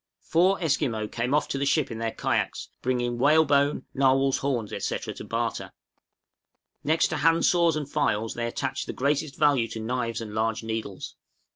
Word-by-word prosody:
} - - -64
Four 185 +4 +4
Esquimaux 130 -8 0
came 120 +2 -2
off 150 - +1
to 135 - -2
the 140 - 0
ship 150 -3 +1
in 115 - -5
their 115 0 -1
kayaks, - - -2
bringing 120 -1 -1
whalebone, 145 -1 +3
narwhals' 135 0 +3
horns, 125 -6 -2
etc., - - -3
to - - -9
barter. - - -3 1.1
Next 155 +2 +2
to - - -2
handsaws 165 +1 +3
and 150 -2 -3
files, 115 -7 0
they 115 0 -2
attached 130 +3 -3
the - - -4
greatest 140 +1 -1
value 145 -6 +3
to 115 0 -7
knives 115 +1 -2
and 110 -2 -7
large 110 +1 -1
needles. 110 -4 -5
135 Hz, 170 wpm, -26 LUFS, 115-150 Hz, 1.1 s, Four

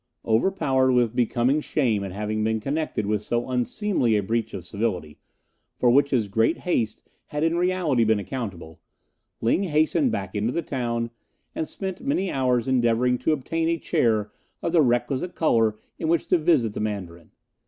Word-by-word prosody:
Overpowered 130 +1 +2
with 120 -2 +2
becoming 125 +4 +2
shame 120 -10 0
at 95 - -5
having 105 +2 -2
been 110 0 0
connected 140 -3 -2
with 105 0 0
so 120 +2 -2
unseemly 125 - +1
a 105 - +1
breach 115 +3 -1
of 90 -3 -7
civility, 90 -7 -3 0.6
for 120 - +3
which 140 +3 +4
his 120 -7 +1
great 115 - +1
haste 120 -11 -2 0.2
had 150 +1 -3
in 165 +1 +2
reality 175 -8 +1
been 110 -1 +3
accountable, 100 - -6 0.6
Ling 115 +11 +2
hastened 175 - +2
back 95 -1 -4
into 105 +3 0
the 170 - -2
town, 120 -4 -2 0.4
and 160 - -3
spent 190 -2 -5
many 220 -9 0
hours 125 -3 +1
endeavouring 125 -1 +2
to - - +1
obtain 160 +3 -1
a 170 - +1
chair 110 -8 +1 0.3
of 170 - 0
the 165 -2 +5
requisite 130 +6 0
colour 115 -8 +2 0.2
in 160 - -2
which 165 +1 +2
to 180 - +4
visit 145 -10 +2
the - - -5
Mandarin. 95 -6 -5
120 Hz, 170 wpm, -24 LUFS, 110-155 Hz, 0.6 s, the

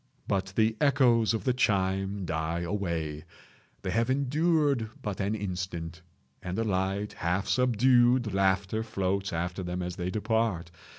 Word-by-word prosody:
But 95 0 -1
the 110 0 +2
echoes 125 -6 +4
of 110 - -3
the 130 - +2
chime 95 -3 0
die 80 +1 -2
away—they 85 -5 -5
have 115 +2 +1
endured 140 -2 +1
but 105 -3 -3
an 100 +2 0
instant—and 90 -2 -6
a 115 - +1
light, 100 0 -1
half 90 +4 -1
subdued 125 -2 +3
laughter 95 +2 +1
floats 100 -3 -2
after 90 +3 -3
them 90 0 -3
as 90 0 -5
they 90 0 -2
depart. 110 -4 -1
100 Hz, 130 wpm, -28 LUFS, 90-115 Hz, -, echoes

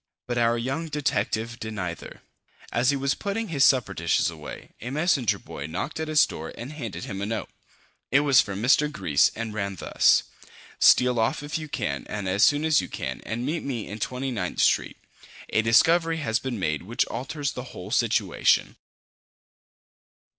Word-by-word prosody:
But 120 -1 -2
our 115 0 +3
young 135 +8 -3
detective 120 -5 -1
did 110 -1 -6
neither. 90 -4 -6 0.5
As 125 +2 +2
he 140 - +3
was 135 +1 0
putting 210 +1 -3
his 140 -4 +2
supper 125 -9 +4
dishes 85 -2 +1
away, - - -10
a 120 - -5
messenger 145 - +1
boy 70 - -8
knocked 85 - -4
at 160 - -2
his 155 -1 +5
door 80 - -7
and 125 +6 -7
handed 115 - -6
him 95 -1 -5
a 100 - -2
note. 110 0 -3 0.6
It 140 - +4
was 140 -3 +5
from 100 +1 -5
Mr. 150 +4 +4
Gryce 75 - +2
and 115 -1 -4
ran 100 -2 -3
thus: - - +3 0.6
"Steal 125 -1 +5
off, 110 +6 0
if 150 +2 -3
you 155 -1 -7
can, - - -3
and 100 -2 -4
as 95 +2 0
soon 145 +6 +4
as 155 -2 +4
you - - -6
can, - - -5
and 120 +2 -3
meet 160 +4 -1
me 120 -6 -4
in 105 +2 -7
Twenty 130 +5 -3
ninth 90 -7 -3
Street. - - +2 0.5
A 110 - +2
discovery 165 +8 +4
has 115 -7 0
been 130 -3 -4
made 75 -6 -1
which 115 +7 0
alters 140 +2 -4
the 125 - -7
whole 95 -4 -9
situation." 110 -6 +2
120 Hz, 185 wpm, -25 LUFS, 105-145 Hz, 0.6 s, his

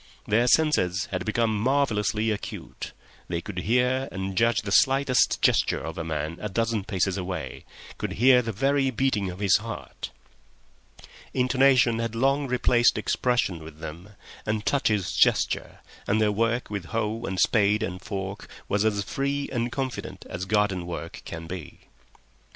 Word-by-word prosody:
Their 115 +4 +2
senses 120 - +3
had 90 -2 -2
become 110 0 +1
marvellously 110 -3 +1
acute; 105 - -6 0.4
they 85 -1 -2
could 90 +1 -6
hear 125 +6 +1
and 95 0 -4
judge 115 +2 +2
the 100 - -4
slightest 135 +3 +3
gesture - - +3
of - - -6
a - - -2
man 80 0 -3
a 105 - -3
dozen 110 0 -1
paces 95 -2 0
away—could 90 0 -6
hear 125 +2 +5
the 115 -2 -3
very 135 +5 +1
beating 115 -6 0
of 90 - -7
his 100 -2 +4
heart. - - -7 1.3
Intonation 130 -2 +4
had 115 -1 -2
long 135 +4 +2
replaced 125 -1 +3
expression 115 -10 0
with 80 -1 -11
them, 85 +6 -9 0.3
and 105 0 -2
touches 105 -9 +1
gesture, - - +1 0.3
and 105 - +2
their 105 -1 +3
work 115 +2 0
with 100 -4 -4
hoe 110 +3 -2
and 95 -3 -3
spade 105 0 +3
and 90 -3 -4
fork 100 -1 -5 0.2
was 100 +1 +1
as 105 -2 +1
free 140 +6 -2
and 120 -1 -1
confident 130 -1 -5
as 90 +2 -5
garden 100 -3 +1
work 85 -1 -6
can 85 0 -7
be. 90 -2 -8
110 Hz, 150 wpm, -26 LUFS, 95-125 Hz, 1.3 s, hear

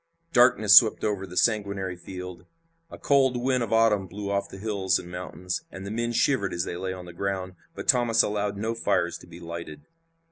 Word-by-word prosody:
Darkness 110 -5 +5
swept 110 -2 +6
over 100 -2 -2
the 90 0 -9
sanguinary 100 -4 0
field. 90 0 -9 0.4
A - - -10
cold 135 -3 +2
wind 130 +1 0
of 115 -2 -3
autumn 110 -4 +3
blew 100 +2 -6
off 100 0 -1
the - - -10
hills 100 -2 0
and 90 - -9
mountains, 90 0 -5
and 95 +1 -9
the 100 - -5
men 120 +2 -2
shivered 120 -4 +1
as 85 - -1
they - - -5
lay 95 +1 -4
on 90 -1 -8
the 90 - -11
ground, 95 0 -3 0.2
but - - -7
Thomas 120 -2 +4
allowed 105 -1 -2
no 110 +3 -2
fires 85 -6 -1
to - - -15
be 85 0 -12
lighted. 85 -2 -8
100 Hz, 205 wpm, -26 LUFS, 90-115 Hz, 0.4 s, swept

